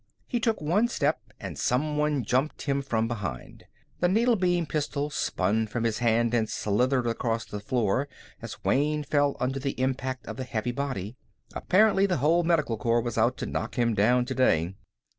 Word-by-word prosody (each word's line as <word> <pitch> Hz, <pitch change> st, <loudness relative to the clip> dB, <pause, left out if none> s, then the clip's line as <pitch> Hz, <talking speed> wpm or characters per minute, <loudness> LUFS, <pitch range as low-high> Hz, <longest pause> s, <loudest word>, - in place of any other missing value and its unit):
He 240 Hz, -, -2 dB
took 225 Hz, -1 st, 0 dB
one 180 Hz, +10 st, +2 dB
step 155 Hz, -9 st, 0 dB, 0.2 s
and -, -, -7 dB
someone 150 Hz, +1 st, 0 dB
jumped 130 Hz, +7 st, 0 dB
him 140 Hz, -1 st, 0 dB
from 115 Hz, -4 st, -1 dB
behind. 100 Hz, -, -6 dB, 0.3 s
The 175 Hz, -, +3 dB
needle 230 Hz, +6 st, +3 dB
beam 175 Hz, -3 st, +1 dB
pistol 150 Hz, -1 st, -2 dB
spun 110 Hz, -5 st, 0 dB
from 115 Hz, +2 st, -3 dB
his 115 Hz, -2 st, 0 dB
hand 115 Hz, 0 st, +2 dB
and 110 Hz, -2 st, +1 dB
slithered 125 Hz, +5 st, +1 dB
across 115 Hz, -1 st, -1 dB
the 105 Hz, -, -6 dB
floor 120 Hz, +4 st, 0 dB, 0.3 s
as -, -, -8 dB
Wayne 150 Hz, +2 st, +1 dB
fell 145 Hz, -1 st, +1 dB
under 130 Hz, +2 st, -1 dB
the 135 Hz, -1 st, -3 dB
impact 130 Hz, -1 st, -2 dB
of 110 Hz, -, -7 dB
the 130 Hz, -, -3 dB
heavy 120 Hz, -1 st, -2 dB
body. 120 Hz, -4 st, -4 dB, 0.4 s
Apparently 200 Hz, 0 st, +3 dB
the 180 Hz, -4 st, 0 dB
whole 160 Hz, +6 st, +3 dB
Medical 160 Hz, -9 st, +1 dB
Corps 115 Hz, +1 st, +1 dB
was 120 Hz, -1 st, -3 dB
out 120 Hz, +3 st, +2 dB
to -, -, -4 dB
knock -, -, -4 dB
him 120 Hz, -2 st, +2 dB
down 120 Hz, +4 st, +3 dB
today. 95 Hz, -10 st, +1 dB
130 Hz, 180 wpm, -27 LUFS, 115-150 Hz, 0.4 s, The